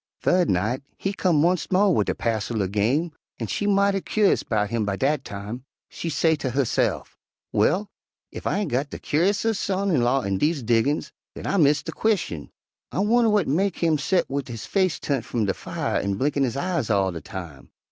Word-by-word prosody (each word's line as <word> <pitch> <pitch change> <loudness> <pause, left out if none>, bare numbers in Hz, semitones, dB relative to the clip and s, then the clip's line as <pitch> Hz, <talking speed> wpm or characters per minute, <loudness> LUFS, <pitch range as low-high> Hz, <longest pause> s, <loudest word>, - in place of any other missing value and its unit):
"Thu'd 180 -2 +3
night 105 +9 0 0.2
he 195 - -2
come 165 -6 +2
onct 180 0 0
mo' 195 +2 +4
wid - - +1
a - - 0
passel 110 -1 -1
er - - -1
game, 120 - +1 0.3
an' - - -2
she 205 - -2
mighty 200 -1 +3
cur'ous 210 0 +2
'bout 105 -2 -1
him 115 -2 0
by 100 -1 -1
dat 135 +5 0
time. 105 +4 -7 0.3
She 170 - -5
say 160 +1 +2
ter 140 -3 -3
husse'f, 130 -1 0 0.4
'Well! 205 +3 +2 0.5
ef - - -5
I - - +1
ain' 205 -2 -1
got 140 +2 -1
de - - -6
curisomest 200 +7 +1
son 195 0 0
in 150 - +3
law 125 +2 +2
in 95 -1 -1
dese 150 -3 +1
diggin's, 120 +6 +1 0.2
den - - -8
I - - 0
miss 145 -3 +4
de - - -5
queschin. 185 - -1 0.4
I - - -5
wunner 230 +3 +3
w'at 210 -3 +2
mek 185 +6 +1
him 160 -3 +1
set 170 +2 +1
wid 140 0 -3
his 115 -3 -6
face 185 -5 +1
turnt 140 -5 -1
f'um 115 -2 -1
de 95 - +1
fire - - -3
an' 100 0 -1
blinkin' 140 +4 +1
his 125 +1 -3
eyes 170 -6 -1
all 100 -3 +2
de 85 -2 -7
time? 85 - -9
145 Hz, 210 wpm, -24 LUFS, 115-185 Hz, 0.5 s, mo